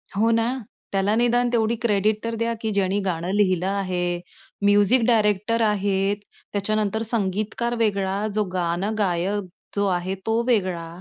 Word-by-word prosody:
हो 220 +3 +3
ना. 230 +3 +1 0.3
त्याला 195 +2 +1
निदान 240 +1 +2
तेवढी 225 0 +2
क्रेडिट 215 -1 +1
तर 230 0 -2
द्या 230 0 0
की 220 - -1
ज्यानी 200 0 +1
गाणं 175 -1 -2
लिहिलं 185 -4 +2
आहे. 180 -3 -1 0.5
म्युझिक 205 +5 +5
डायरेक्टर 220 0 +2
आहेत. 200 -1 +1 0.4
त्याच्यानंतर 215 +1 0
संगीतकार 215 +2 -1
वेगळा 200 -2 0
जो 215 - +2
गाणं 180 +3 -1
गायक 195 +1 0 0.3
जो 200 0 +1
आहे 185 +1 -1
तो 225 +1 +1
वेगळा 185 -8 +1
205 Hz, 140 wpm, -23 LUFS, 190-225 Hz, 0.5 s, म्युझिक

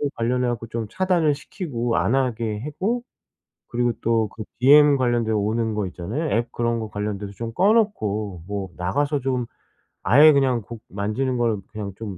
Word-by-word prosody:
관련해 125 +2 0
갖고 115 -1 -3
좀 115 -1 -4
차단을 175 - +2
시키고 120 - -3
안 115 - +1
하게 115 -5 -1
하고 200 - -2 0.7
그리고 120 0 0
또 115 -2 +2
그 110 - -8 0.2
DM 145 +2 +7
관련돼 120 -3 +1
오는 110 +1 0
거 105 -2 -1
있잖아요. 110 - -4
앱 120 +1 -2
그런 115 0 0
거 110 - -5
관련돼서 105 -1 -4
좀 115 +3 -6
꺼 195 - +4
놓고 105 - 0
뭐 100 -1 -4
나가서 140 +12 0
좀 125 -2 -1 0.6
아예 145 - +7
그냥 130 -4 +2
곡 115 +2 -10
만지는 110 +6 -2
걸 115 -4 0
그냥 105 -3 -6
좀 100 -5 -6
115 Hz, 310 characters per minute, -23 LUFS, 105-135 Hz, 0.7 s, DM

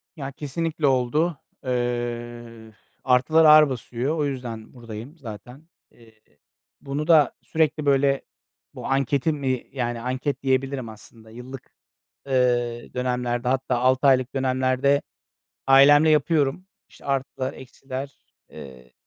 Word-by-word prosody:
Ya, 140 -4 -6
kesinlikle 150 +2 -2
oldu. 135 +5 +1 0.3
Eee, 120 -2 -4 0.3
artılar 135 +6 +4
ağır 155 -1 +8
basıyor. 125 +3 -3
O 150 - 0
yüzden 120 -5 -6
buradayım 120 +4 -10
zaten. 125 +3 -11 0.2
Eee, 110 -2 -22 0.6
bunu 145 +2 -4
da 155 -5 +5
sürekli, 155 -1 0
böyle, 140 -1 +2 0.5
bu - - -9
anketi 140 +3 +1
mi, 130 -4 -2
yani, 120 -3 -3
anket 130 +4 -3
diyebilirim 130 -2 -1
aslında. 110 +1 -14
Yıllık, 125 +3 -11 0.5
eee, 120 -2 0
dönemlerde, 125 -1 -2
hatta 130 -1 0
6 130 +2 +3
aylık 130 -1 +2
dönemlerde 130 +1 +1 0.7
ailemle 145 +3 +7
yapıyorum. 150 +2 +1 0.2
İşte, - - -18
artılar, 135 -1 -2
eksiler, 130 +1 -8 0.4
eee, 65 -2 -12
130 Hz, 115 wpm, -24 LUFS, 120-140 Hz, 0.7 s, ağır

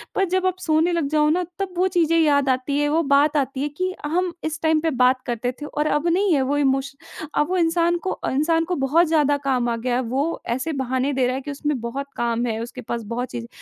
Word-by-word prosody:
पर 390 - +2
जब 375 0 0
आप 370 0 0
सोने 320 0 +2
लग 330 -4 0
जाओ 300 0 +3
ना, 360 +3 +1 0.2
तब 390 -2 -3
वो 370 +1 +3
चीज़ें 330 -3 +2
याद 285 -3 +3
आती 260 +2 0
हैं, 295 - +1
वो 320 +3 +2
बात 285 +1 +3
आती 270 -1 -1
है 295 - -1
कि 370 0 -1
हम 350 +3 0
इस 315 0 -3
टाइम 315 -1 +3
पे 330 - +1
बात 255 +1 +3
करते 245 0 -2
थे - - -4
और 300 +1 -2
अब 295 +3 0
नहीं 370 +2 +2
है 280 - +3
वो 275 +2 0
इमोशन 275 +2 -2
अब 295 - -1
वो 370 - 0
इंसान 340 0 +2
को 380 - -1
अ, - - -3
इंसान 325 +4 +2
को 360 +1 -2
बहुत 325 +6 +3
ज़्यादा 295 -3 +2
काम 250 -3 +1
आ 235 - 0
गया 240 +1 -1
है, 250 - +1
वो 270 +7 -2
ऐसे 305 +5 -3
बहाने 260 +2 -1
दे 260 -1 +1
रहा 255 - -1
है 270 - -3
कि 290 - -6
उसमें 285 -1 -2
बहुत 270 +4 -4
काम 235 0 0
है, 225 -2 -2
उसके 250 +2 -8
पास 235 0 -4
बहुत 250 +1 -3
चीज़ें 235 -1 -6
290 Hz, 260 wpm, -22 LUFS, 260-330 Hz, 0.2 s, जाओ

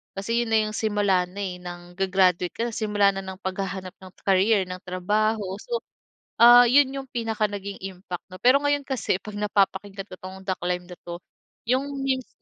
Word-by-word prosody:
Kasi 230 +5 0
'yon 230 - -6
na - - +6
yung 215 - -6
simula 205 -4 +2
na, 195 +3 -9
eh, 180 -2 -4
ng 175 0 -9
ga-graduate 185 -2 +2
ka 230 - -2
na - - -9
simula 205 -2 +2
na 195 - -2
ng 190 0 -7
paghahanap 190 -1 -4
ng 185 -1 -12
career, 195 +1 +3
ng 180 0 -6
trabaho. 210 +4 0 0.2
So, 475 -1 -3 0.6
ah, 240 +1 +10
'yon 265 +2 +5
yung 270 -1 -5
pinaka 225 -3 -1
naging 200 -1 -6
impact 180 -2 -6
'no. 185 - -8
Pero 255 +3 +6
ngayon 290 -1 +1
kasi 265 -7 0
'pag 210 -1 -8
napapakinggan 200 -1 0
ko - - -6
tong 190 +1 -9
The 185 - +1
Climb 180 0 -2
na 180 - -9
'to, 175 +1 -6 0.5
yung 260 +3 +1 0.2
memes. 260 -2 -1
200 Hz, 195 wpm, -25 LUFS, 185-225 Hz, 0.6 s, ah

